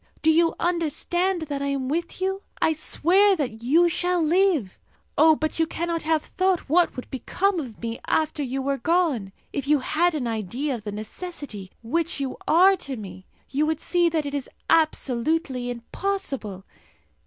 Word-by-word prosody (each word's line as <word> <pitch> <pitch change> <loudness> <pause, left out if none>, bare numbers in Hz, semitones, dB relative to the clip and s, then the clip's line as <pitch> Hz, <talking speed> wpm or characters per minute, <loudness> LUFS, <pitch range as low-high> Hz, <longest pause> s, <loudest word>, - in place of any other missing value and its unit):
Do 320 - +6
you 330 +1 +3
understand 345 +1 0
that 285 -2 -4
I 280 - -1
am 275 -2 -1
with 335 +6 -2
you? 385 +1 -1 0.2
I 320 - +3
swear 380 +6 +3
that 245 -9 -3
you 320 +9 +4
shall 355 +1 0
live! 330 - +2 0.4
Oh, 315 0 +6
but 310 +1 -2
you 325 - +3
cannot 335 0 -2
have 315 -1 +1
thought 375 -1 +1
what 340 +4 +3
would 255 - -6
become 365 +8 0
of 250 -8 -7
me 230 0 -3
after 310 -1 +1
you 270 0 -2
were 275 0 -1
gone. 315 - +1 0.2
If 280 -1 -3
you 300 0 +5
had 320 +5 +1
an 275 -5 -2
idea 230 +6 -2
of 225 -4 -6
the 205 - -3
necessity 215 - -7
which 330 +7 -1
you 270 -2 -3
are 375 +4 +6
to 270 -6 -6
me, 190 -3 -9 0.2
you 295 +3 +1
would 315 -1 0
see 350 0 +2
that 315 -2 -1
it 285 - -4
is 280 -3 -3 0.2
absolutely 285 -3 +1
impossible! 240 - -4
310 Hz, 175 wpm, -25 LUFS, 255-340 Hz, 0.4 s, Do